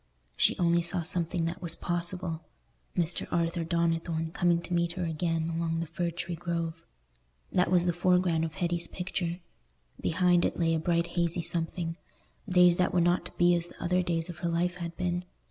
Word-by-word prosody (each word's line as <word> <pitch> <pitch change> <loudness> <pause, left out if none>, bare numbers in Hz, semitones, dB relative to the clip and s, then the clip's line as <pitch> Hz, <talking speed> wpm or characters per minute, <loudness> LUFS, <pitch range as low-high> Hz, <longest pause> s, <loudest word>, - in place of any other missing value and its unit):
She - - +3
only 170 -1 +3
saw 175 +1 +1
something 170 -1 0
that 170 +2 -4
was 170 -2 +2
possible: 175 -1 -2 0.6
Mr. 175 -1 0
Arthur 170 0 0
Donnithorne 165 -1 0
coming 175 -1 +3
to 180 - -5
meet 170 0 +1
her 180 -1 -2
again 165 0 -1
along 165 0 -1
the 165 - -1
Fir 170 +2 -2
tree 170 +1 -5
Grove. 165 -1 -3 0.7
That 180 -1 +2
was 175 -1 +3
the 175 - +2
foreground 180 -1 +2
of 160 -1 -3
Hetty's 170 -1 -1
picture; 180 -1 -3 0.6
behind 175 0 +3
it - - 0
lay 165 -1 +2
a 160 - +1
bright 170 +1 +1
hazy 170 0 -1
something—days 175 +2 0
that 180 0 +1
were - - +5
not 175 +1 +2
to - - -14
be 175 0 +4
as 170 0 0
the - - -15
other 180 +1 +1
days 170 -2 -1
of 175 -3 -8
her 170 - -1
life 175 +1 0
had 170 -1 -6
been. 175 0 -1
170 Hz, 185 wpm, -29 LUFS, 165-175 Hz, 0.7 s, were